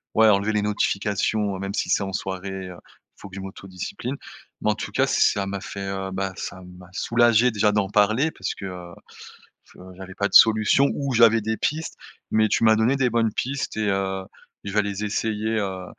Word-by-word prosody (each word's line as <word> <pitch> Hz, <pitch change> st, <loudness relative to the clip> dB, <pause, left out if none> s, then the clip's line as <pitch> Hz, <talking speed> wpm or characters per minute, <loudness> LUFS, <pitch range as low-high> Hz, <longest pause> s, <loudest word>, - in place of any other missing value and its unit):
ouais, 110 Hz, 0 st, +6 dB
enlever 100 Hz, +1 st, +2 dB
les 105 Hz, -, +1 dB
notifications, 105 Hz, 0 st, 0 dB
même 100 Hz, 0 st, -4 dB
si -, -, -2 dB
c'est -, -, +2 dB
en 95 Hz, -, -4 dB
soirée, 95 Hz, 0 st, -4 dB
heu, 90 Hz, -, -10 dB, 0.4 s
il -, -, -24 dB
faut 100 Hz, -, -9 dB
que 95 Hz, -, -12 dB
je -, -, -5 dB
m'autodiscipline 95 Hz, +7 st, -6 dB, 0.4 s
mais 105 Hz, -, +2 dB
en -, -, -1 dB
tout -, -, -6 dB
cas, -, -, +2 dB
ça 100 Hz, -1 st, +2 dB
m'a 100 Hz, -1 st, -4 dB
fait, 100 Hz, -, -7 dB
heu, 95 Hz, 0 st, -4 dB
bah, 95 Hz, 0 st, -3 dB
ça 95 Hz, -2 st, -6 dB, 0.2 s
m'a 90 Hz, 0 st, -14 dB
soulagé, 120 Hz, +2 st, +3 dB
déjà, 105 Hz, -1 st, +2 dB
d'en 105 Hz, -2 st, 0 dB
parler 110 Hz, +9 st, +3 dB
parce -, -, -4 dB
que, -, -, -8 dB
heu, 90 Hz, -2 st, -8 dB, 0.7 s
je -, -, -21 dB, 0.2 s
j'avais 95 Hz, -1 st, -10 dB
pas 100 Hz, -, 0 dB
de -, -, -20 dB
solution 110 Hz, +5 st, +6 dB
ou 140 Hz, -2 st, -2 dB
j'avais 115 Hz, -1 st, +5 dB
des 110 Hz, +1 st, -2 dB
pistes 160 Hz, +2 st, -2 dB, 0.4 s
mais 110 Hz, 0 st, +3 dB
tu -, -, +1 dB
m'as 110 Hz, -1 st, +6 dB
donné 110 Hz, +5 st, +2 dB
des 125 Hz, -2 st, +2 dB
bonnes 115 Hz, -2 st, +1 dB
pistes 135 Hz, -3 st, -3 dB
et 110 Hz, -1 st, 0 dB
heu, 95 Hz, -1 st, -2 dB, 0.4 s
je 100 Hz, -, -5 dB
vais 105 Hz, -, +3 dB
les 100 Hz, 0 st, -4 dB
essayer, 110 Hz, +1 st, -1 dB
heu, 95 Hz, -2 st, -4 dB
105 Hz, 210 wpm, -23 LUFS, 95-110 Hz, 0.7 s, ouais